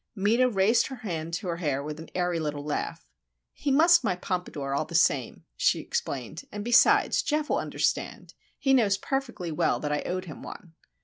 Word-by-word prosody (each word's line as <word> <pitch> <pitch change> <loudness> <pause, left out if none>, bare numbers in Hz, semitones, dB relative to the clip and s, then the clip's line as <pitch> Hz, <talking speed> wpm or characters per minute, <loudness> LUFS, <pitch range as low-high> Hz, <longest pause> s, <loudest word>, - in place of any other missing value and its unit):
Meta 225 +6 +3
raised 220 +2 +3
her 265 - -7
hand 170 -9 -5
to 185 +2 -5
her 170 -1 -2
hair 145 -5 -1
with 150 +1 -6
an 160 - -10
airy 175 -2 0
little 150 -2 -3
laugh. 150 - -3 0.5
"He - - -3
mussed 325 +3 +5
my 195 -6 +1
pompadour, 175 -7 -4
all 140 - 0
the 170 - -8
same," 140 -6 +1
she - - +2
explained. 140 +5 -4
"And 205 0 -6
besides, 240 0 +5
Geof 300 0 -1
will - - +2
understand. - - -2 0.2
He 270 - +2
knows 210 -6 +3
perfectly 240 -11 -3
well 155 - +1
that 150 - -3
I 150 - 0
owed 185 +1 -3
him 155 - -9
one." 175 -5 -10
180 Hz, 190 wpm, -27 LUFS, 155-235 Hz, 0.5 s, mussed